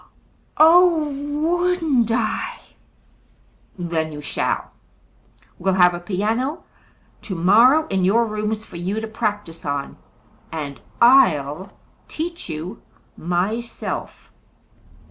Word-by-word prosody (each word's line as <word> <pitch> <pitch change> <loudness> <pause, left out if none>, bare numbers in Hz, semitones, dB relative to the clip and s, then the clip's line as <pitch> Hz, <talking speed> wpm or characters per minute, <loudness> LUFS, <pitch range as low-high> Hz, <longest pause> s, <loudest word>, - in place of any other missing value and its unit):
"Oh, 325 -1 +5
wouldn't 300 -2 0
I!" 230 -1 -1 1.2
"Then 165 -3 -2
you 150 - -8
shall! 145 - -2 0.9
We'll 190 +1 +1
have 180 -1 +5
a 175 - -4
piano 215 - -2 0.6
tomorrow 225 - +4
in 190 -1 -1
your 225 +6 +3
rooms 215 0 -3
for - - -10
you 190 +5 -2
to 220 - -5
practise 210 -6 -4
on. 140 -1 -4 0.5
And 145 -4 -6 0.2
I'll 190 - +4 0.4
teach 335 - -5
you 165 +7 -6 0.3
myself." 190 +8 -4
215 Hz, 95 wpm, -21 LUFS, 175-270 Hz, 1.2 s, Oh